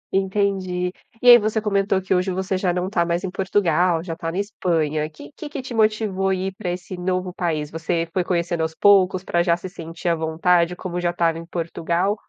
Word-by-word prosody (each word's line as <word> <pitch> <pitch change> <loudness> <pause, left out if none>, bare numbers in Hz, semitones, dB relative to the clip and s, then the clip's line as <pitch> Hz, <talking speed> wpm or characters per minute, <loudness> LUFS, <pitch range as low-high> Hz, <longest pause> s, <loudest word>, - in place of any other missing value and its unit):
Entendi. 190 -2 0 0.3
E - - +2
aí 240 0 +11
você 215 +1 0
comentou 200 -2 +1
que 190 0 -1
hoje 185 +1 +1
você 190 +1 -2
já 185 -1 +1
não 180 +1 -1
está 185 -3 +1
mais 170 +2 -1
em 190 - -3
Portugal, 180 -3 +1
já 165 -2 -5
tá 165 0 -4
na 175 - -5
Espanha. 160 -7 -1
Que 150 -2 -13 0.2
que 290 - -5
te 260 -1 -8
motivou 215 -3 +1
a 190 - +2
ir 190 +1 -3
para 200 -4 -4
esse 180 +1 -5
novo 180 0 -2
país? 155 -5 -2
Você 165 +1 -2
foi 185 - +1
conhecendo 170 -1 -1
aos 160 0 -2
poucos, 190 -2 +4
pra 170 -2 +1
já 170 -1 +2
se 180 - -7
sentir 165 0 -5
à 170 - +3
vontade, 170 +2 +1
como 180 -1 -4
já 175 - +1
estava 170 -1 0
em 165 - -9
Portugal, 170 +3 -1
180 Hz, 215 wpm, -22 LUFS, 170-195 Hz, 0.3 s, aí